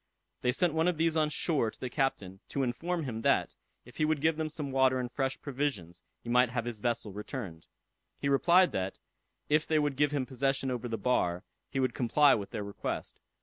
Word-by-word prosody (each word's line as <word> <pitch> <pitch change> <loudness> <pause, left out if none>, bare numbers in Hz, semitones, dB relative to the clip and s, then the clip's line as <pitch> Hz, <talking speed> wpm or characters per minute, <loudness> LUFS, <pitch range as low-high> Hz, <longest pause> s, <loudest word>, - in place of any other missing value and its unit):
They 125 - +2
sent 170 +5 +1
one 160 +2 +2
of 180 -3 +1
these 165 0 +2
on 155 -1 +2
shore 150 -6 0
to - - -14
the 130 - -3
captain, 110 -8 -2
to 140 - -1
inform 165 +8 -2
him 115 -5 -4
that, - - +2 0.3
if - - -15
he 155 - +2
would 155 -1 +1
give 160 +2 +2
them 155 0 -2
some 150 -2 -5
water 130 -1 +3
and 125 -1 -3
fresh 135 0 -2
provisions, 130 - -3 0.2
he - - -12
might 125 +1 +4
have 120 -1 -2
his 120 -3 -5
vessel 115 -2 -2
returned. 105 - -7 0.5
He 140 - -1
replied 175 +6 +5
that, 95 0 -3 0.5
if 155 +1 +2
they 160 - +2
would 145 -2 +1
give 145 +2 +3
him 140 -3 0
possession 135 0 -1
over 125 -1 -3
the 115 -1 -2
bar, 95 -6 0 0.3
he 135 - -2
would 130 -2 +1
comply 135 +3 +4
with 100 -3 -2
their 105 - -4
request. 100 0 -5
130 Hz, 215 wpm, -30 LUFS, 115-150 Hz, 0.5 s, replied